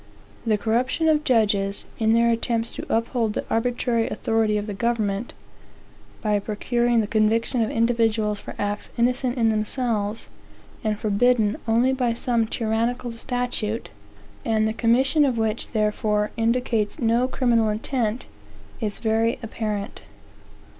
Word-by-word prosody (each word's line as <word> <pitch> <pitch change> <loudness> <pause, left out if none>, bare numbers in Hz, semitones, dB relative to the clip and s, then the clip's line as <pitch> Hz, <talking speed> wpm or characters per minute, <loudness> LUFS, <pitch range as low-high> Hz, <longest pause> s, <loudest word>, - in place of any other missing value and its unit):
The 215 -1 +3
corruption 245 +9 0
of 305 -1 +3
judges, 205 -6 +1
in 220 0 +3
their 235 0 +4
attempts 230 0 -1
to - - -7
uphold 230 -1 0
the - - -3
arbitrary 235 0 0
authority 220 -1 +1
of 205 - -2
the 210 - -4
government, 215 0 -1 0.9
by 210 -1 +2
procuring 235 +3 +1
the - - -1
conviction 225 +3 +1
of 220 - +1
individuals 225 -2 +1
for - - -9
acts 205 0 -3
innocent 250 +1 +1
in 225 -2 +3
themselves, 215 -1 -1 0.6
and 215 -1 0
forbidden 215 +1 +2
only 235 +4 +3
by 250 -3 0
some 235 -2 0
tyrannical 230 +2 -1
statute, 235 -2 -3 0.5
and 220 -1 +1
the 220 - -1
commission 260 +7 +3
of 260 -4 +1
which 220 0 -1
therefore 210 -1 0
indicates 230 -2 0
no 235 +2 +2
criminal 235 -4 +2
intent, 225 +1 -2 0.6
is 210 -2 -2
very 225 +1 +1
apparent. 215 -2 -4
225 Hz, 135 wpm, -24 LUFS, 215-240 Hz, 0.9 s, their